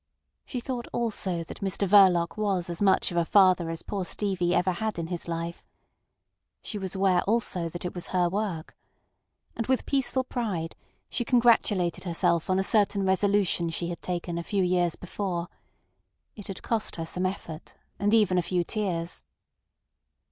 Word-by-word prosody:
She 250 - -3
thought 245 -1 -4
also 195 -7 -1
that - - -10
Mr 195 0 -1
Verloc 185 -4 +5
was 195 -5 -1
as 170 - -6
much 195 -2 +3
of 175 - -3
a 170 - +4
father 185 -2 +4
as 165 0 -5
poor 200 -2 -3
Stevie 180 -2 -1
ever 185 +1 +2
had 215 +3 -3
in 165 - -2
his 175 -2 -5
life. 170 0 -4 1.0
She 210 - -5
was 190 0 -5
aware 190 -2 +3
also 195 -6 +1
that 175 +2 -7
it 180 - -3
was 175 - -6
her 180 -1 +2
work. 190 -4 -3 0.8
And 230 - -3
with 260 0 +1
peaceful 265 -1 +1
pride 205 -11 -3 0.3
she 240 - -2
congratulated 230 -8 +3
herself 170 -1 +1
on 185 - +3
a 190 - +2
certain 200 -1 +3
resolution 190 -2 +2
she 170 +1 -3
had 170 - -6
taken 175 -1 -3
a - - -4
few 195 +1 0
years 175 -2 +1
before. 180 -2 -4 0.9
It 205 - -9
had 195 - -7
cost 225 -2 -1
her 165 - -4
some 180 +3 -1
effort, 170 -4 -7 0.2
and 205 +1 +2
even 210 -5 +4
a - - +2
few 175 +1 0
tears. 175 -4 -3
185 Hz, 170 wpm, -27 LUFS, 175-205 Hz, 1.0 s, Verloc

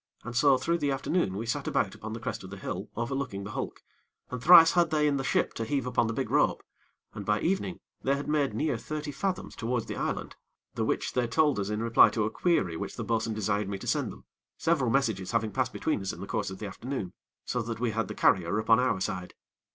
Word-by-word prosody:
And 120 +1 -7
so 135 +2 +5
through 170 +7 0
the 145 - 0
afternoon 135 - 0
we 110 - -3
sat 140 +4 -2
about 95 - +1
upon 110 0 -7
the 115 - -5
crest 110 - -4
of 95 - -9
the 100 - -8
hill - - -5
overlooking 120 -4 -3
the 105 - -6
hulk, - - -5 0.5
and 125 -1 -4
thrice 165 +1 +9
had 175 -2 +3
they 150 -1 +2
in 140 -1 +2
the 135 - -2
ship - - +1
to 115 - -3
heave 135 +2 -1
upon 125 -2 +1
the 115 - -2
big - - -3
rope, - - +2 0.5
and 100 - -6
by 105 +1 +1
evening 185 0 -1 0.2
they 135 - +2
had 140 - -5
made 145 -7 +1
near 140 -1 0
thirty 150 +3 -4
fathoms 185 +7 -3
towards 120 0 -2
the - - -5
island, - - -3 0.4
the - - -1
which - - -1
they 125 -1 +1
told 145 +2 +2
us 100 0 -2
in 105 +1 -2
reply 115 0 +6
to 110 - -1
a 110 - -2
query 130 - +1
which - - -5
the - - -4
bo'sun 115 -1 0
desired 105 -1 0
me 100 - -3
to - - -9
send - - 0
them, - - -14 0.3
several 155 -7 +1
messages 115 -7 0
having 115 -2 +1
passed - - 0
between - - -1
us 95 - -2
in - - -10
the - - -5
course - - -2
of 95 - -7
the 110 - -6
afternoon, 105 -1 -5 0.3
so 125 - -1
that 115 0 -5
we 120 -1 0
had 115 +1 -1
the - - -6
carrier 95 0 +3
upon 110 +2 +4
our 125 -6 +1
side. 95 -2 -4
115 Hz, 245 wpm, -29 LUFS, 105-140 Hz, 0.5 s, thrice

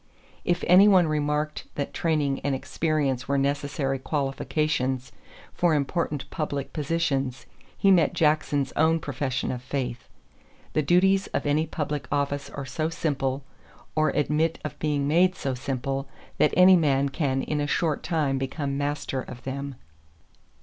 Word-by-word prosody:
If 175 -1 0
any 185 +3 +7
one 185 -4 +6
remarked 150 0 -1
that 140 - -3
training 150 -5 0
and 140 -1 -1
experience 140 -2 -1
were 140 - +1
necessary 140 -1 -1
qualifications 135 -2 -1 0.4
for 170 -3 +2
important 150 0 -1
public 145 -3 -3
positions, 145 -4 -1 0.3
he 195 - +4
met 175 -4 +4
Jackson's 150 -3 +1
own 160 +1 +3
profession 135 -3 -2
of 125 - -4
faith: 125 -2 -4 0.6
"The 155 - +2
duties 190 +5 +3
of - - -1
any 150 +2 +1
public 150 -2 -3
office 140 0 -1
are 140 - -6
so 155 +5 -2
simple 135 -4 -1 0.5
or 155 0 +3
admit 150 +2 +1
of 150 - -6
being 145 -2 0
made 180 +5 +4
so 135 - -2
simple 135 +1 -3 0.3
that 150 - +3
any 185 +1 +8
man 140 -4 +2
can 135 -2 -1
in 150 -1 -1
a 145 - -1
short 155 0 0
time 150 -6 0
become 140 +1 -3
master 145 -2 -2
of 125 -1 -10
them." 140 +1 -5
145 Hz, 145 wpm, -26 LUFS, 135-155 Hz, 0.6 s, any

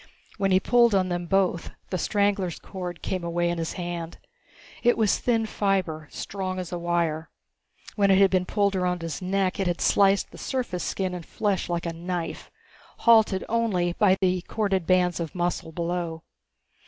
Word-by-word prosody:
When 195 -1 +2
he 185 0 +5
pulled 235 +1 +4
on 185 -1 +2
them 175 -1 -3
both, 185 -2 +1 0.2
the 185 - -1
strangler's 200 -2 0
cord 180 -3 -7
came 185 -2 -2
away 170 0 0
in 175 - -3
his 165 - -3
hand. 175 -2 -5 0.6
It 240 0 +3
was 220 -3 +2
thin 230 -2 +1
fiber, 190 -8 -1
strong 190 -2 -4
as 180 -1 -5
a 175 - -3
wire. 170 -2 -1 0.7
When 200 -2 +3
it 190 - +6
had 195 -1 +5
been 185 -1 +1
pulled 200 -2 +1
around 180 -2 -1
his 165 0 -4
neck 190 +1 0
it 195 - +1
had 175 -1 -1
sliced 195 0 +3
the - - -12
surface 245 -9 -3
skin 185 -2 -2
and 180 -1 -5
flesh 200 0 -1
like 170 0 -2
a 170 - -2
knife, 175 0 -4 0.6
halted 220 -5 +5
only 205 -7 +1
by 190 0 +4
the 185 -1 +1
corded 195 -5 -1
bands 180 -2 +3
of 165 -1 -5
muscle 175 -2 -2
below. 170 -1 -3
185 Hz, 180 wpm, -26 LUFS, 175-195 Hz, 0.7 s, it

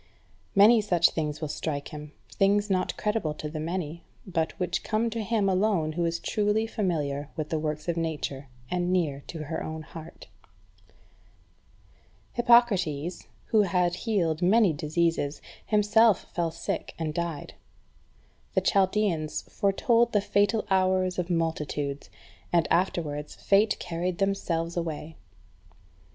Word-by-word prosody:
Many 215 +3 +7
such 175 -5 +3
things 150 -1 -3
will 155 - -2
strike 145 -1 -4
him, 150 -1 -8 0.2
things 205 +1 +2
not 185 -1 0
credible 210 -8 -1
to 150 - -5
the 155 +1 -5
many, 170 0 -4 0.2
but 170 -1 -2
which 180 -1 -1
come 225 +1 0
to 230 0 -3
him 215 -1 +1
alone 190 -4 +2
who 170 +2 -1
is 165 0 0
truly 210 +3 +1
familiar 150 -10 -2
with 155 -2 -4
the 160 - -1
works 155 0 -3
of 170 -1 -1
Nature 150 -4 -3 0.2
and 180 0 0
near 150 -7 0
to 160 -2 -6
her 155 +2 -4
own 155 0 -5
heart. 165 +1 -11 0.6
3. - - -30 1.4
Hippocrates, 190 -10 +3 0.2
who 220 - +5
had 180 -3 +1
healed 180 -6 0
many 195 0 +4
diseases, 155 0 0 0.3
himself 210 0 +4
fell 170 -1 0
sick, 160 - -4
and 155 -2 -3
died. 170 -3 -4 1.0
The - - +4
Chaldeans 190 -6 +1
foretold 235 +4 +2
the 205 - +3
fatal 205 +2 +1
hours 185 -1 +2
of 180 0 -2
multitudes, 150 -4 -2 0.4
and 170 -2 +3
afterwards 155 -5 0
fate 205 +2 +3
carried 175 +1 -3
themselves 170 -4 -1
away. 160 -2 -4
175 Hz, 135 wpm, -27 LUFS, 155-200 Hz, 1.4 s, Many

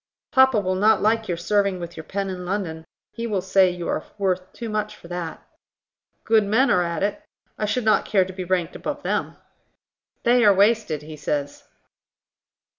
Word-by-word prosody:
"Papa 265 -5 +5
will 185 -2 -1
not 210 +2 +3
like 220 +1 +2
your 175 - -2
serving 200 +1 +1
with 170 0 -7
your 160 - -7
pen 195 +4 -3
in 180 -1 -6
London: 175 -4 -3 0.3
he 235 0 -5
will 205 -4 0
say 190 0 +4
you 175 -1 -5
are - - -1
worth 185 -2 -1
too 235 - -7
much 215 -1 -2
for - - -14
that." 175 -2 -6 0.8
"Good 220 -1 +4
men 225 +7 +3
are 180 - +4
at 170 0 -2
it; 210 +10 -2 0.3
I 215 - -2
should 220 +3 -1
not 215 - +4
care 190 -3 +2
to 190 - -8
be 185 0 -5
ranked 180 -1 -1
above - - -5
them." - - -2 0.9
"They 240 0 +4
are 205 -2 +6
wasted, 200 -7 +2
he 155 +1 -9
says." 145 -1 -3
195 Hz, 190 wpm, -23 LUFS, 175-215 Hz, 0.9 s, are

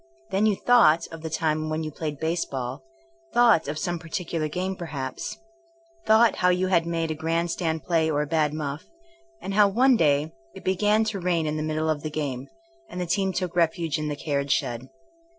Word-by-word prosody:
Then 200 +3 +2
you 210 - +2
*' - - -22
thought 170 -10 +5
of 165 -1 -8
the 160 - -5
time 155 -1 -1
when 155 +1 -2
you 155 - -4
played 150 -1 -5
baseball, 140 -5 -3 0.5
thought'* 230 -11 +5
of 150 +2 -3
some 175 +1 -2
particular 165 -1 -3
game 185 +5 -3
perhaps, 140 -7 -5 0.7
thought" 220 +1 +5
how 180 - +3
you 180 +1 +1
had 170 -3 +2
made 165 -1 -1
a - - 0
grand 165 +2 -1
stand 160 -4 -2
play 160 0 +1
or 150 -1 +1
a - - -4
bad 155 -1 +1
muff, 150 -1 -4 0.6
and 195 - -4
how 205 0 +6
one 250 +6 +4
day 150 -4 +2 0.2
it 190 - -10
began 210 +4 +2
to 215 -2 -3
rain 175 -3 0
in 150 0 -1
the 155 - -2
middle 155 +1 -1
of 155 -2 0
the 155 - -4
game, 140 -4 -4 0.4
and 180 - -6
the 180 - -1
team 190 +2 0
took 180 -1 -3
refuge 165 -2 +1
in 150 - -2
the 150 - -2
carriage 140 -1 -2
shed. 130 -1 -1
160 Hz, 205 wpm, -25 LUFS, 150-180 Hz, 0.7 s, how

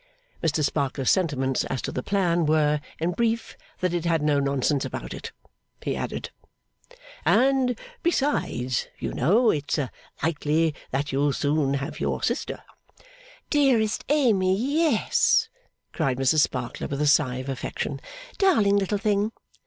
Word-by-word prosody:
Mr 155 -2 +1
Sparkler's 140 -2 0
sentiments 135 -8 +1
as 130 - -3
to - - -4
the 125 - -3
plan 175 -2 +1
were, 150 -1 +2 0.2
in 165 +2 0
brief, 230 +4 -1 0.3
that 180 -1 0
it 175 -2 -1
had 165 -3 +1
no 150 -1 +3
nonsense 140 0 +1
about - - -5
it. - - -7 0.5
He - - -1
added, - - -4 0.9
'And 260 -2 +3 0.2
besides, 270 - 0
you - - -4
know 215 - +3
it's 145 +1 -1 0.5
likely 160 0 +1 0.2
that 140 +2 -2
you'll 140 +1 +1
soon 145 -1 +1
have 140 +3 -4
your - - -2
sister - - -2 0.4
' - - -24
'Dearest 255 -8 +2
Amy, 210 -11 +3
yes!' 295 +8 +2 0.4
cried 135 -6 0
Mrs 135 +4 +3
Sparkler 125 -4 -1
with 140 - -4
a - - +2
sigh 145 -3 +3
of 130 +1 -5
affection. 135 +1 -4 0.4
'Darling 225 - +4
little 200 +1 0
thing! 205 +1 +1
160 Hz, 140 wpm, -25 LUFS, 140-220 Hz, 0.9 s, Darling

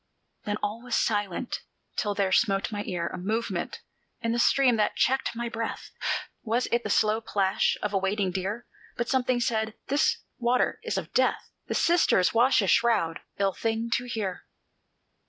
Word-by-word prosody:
Then 205 0 -1
all 210 +3 -2
was 245 -1 -2
silent, 205 +2 0 0.4
till 205 -1 -1
there 195 -2 +1
smote 195 -1 +2
my 205 -1 -3
ear 175 -3 -2
A 180 - -4
movement 220 +5 -2 0.4
in 230 - -1
the 235 - 0
stream 255 0 +4
that 210 - +1
checked 265 -2 +1
my 235 +1 -2
breath: 230 -1 -4 0.5
Was 235 +2 0
it 235 - +2
the 210 - -4
slow 215 +2 +3
plash 195 -3 +1
of 210 -1 -1
a 195 - +3
wading 195 0 0
deer? 195 +6 -3 0.3
But 240 0 -2
something 255 -2 +2
said, 220 -2 0
"This 285 +3 +3 0.2
water 245 +1 +1
is - - -2
of - - -5
Death! - - +1 0.2
The - - -2
Sisters 330 - +3
wash 235 -1 +4
a - - 0
shroud, 180 -6 +3 0.2
ill 195 -1 +1
thing 225 +2 -2
to 245 - 0
hear!" 210 -6 -4
220 Hz, 175 wpm, -27 LUFS, 200-240 Hz, 0.5 s, stream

